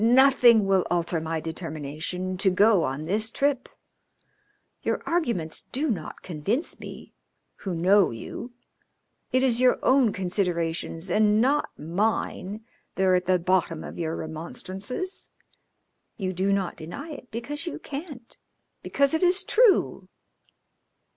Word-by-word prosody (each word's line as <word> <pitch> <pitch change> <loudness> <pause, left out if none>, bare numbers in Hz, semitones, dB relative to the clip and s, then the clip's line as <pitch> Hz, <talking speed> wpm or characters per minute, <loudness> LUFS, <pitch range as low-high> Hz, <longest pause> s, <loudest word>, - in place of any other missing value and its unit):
Nothing 245 -3 +6
will 195 -2 +3
alter 170 -1 0
my 160 0 -2
determination 160 +3 -4
to 190 +1 +3
go 200 0 +4
on 135 +4 -3
this 215 +6 0
trip. 275 +1 0 1.1
Your - - -1
arguments 235 - -1
do 285 +2 0
not 170 -8 -5
convince 190 - -2
me, - - -10 0.4
who 190 -3 -4
know 185 +3 +4
you. 115 - -7 0.8
It 255 0 +2
is 250 -2 +3
your 255 -1 +5
own 260 -4 +4
considerations 175 -2 -2
and 210 +1 +4
not 275 +5 +2
mine 205 +4 -2 0.3
that 190 - 0
are 185 -1 +4
at 180 0 +1
the 185 0 +4
bottom 175 -2 0
of - - -8
your 165 -1 -2
remonstrances. 190 - -5 0.9
You 185 -3 -2
do 190 +2 0
not 195 -3 -1
deny 230 - -7
it, 265 -4 -10
because 285 +8 -5
you - - -4
can't, 280 -5 -8 0.4
because 280 +2 +1
it 320 - +1
is 365 +1 +4
true." 445 +1 +3
195 Hz, 135 wpm, -26 LUFS, 170-255 Hz, 1.1 s, Nothing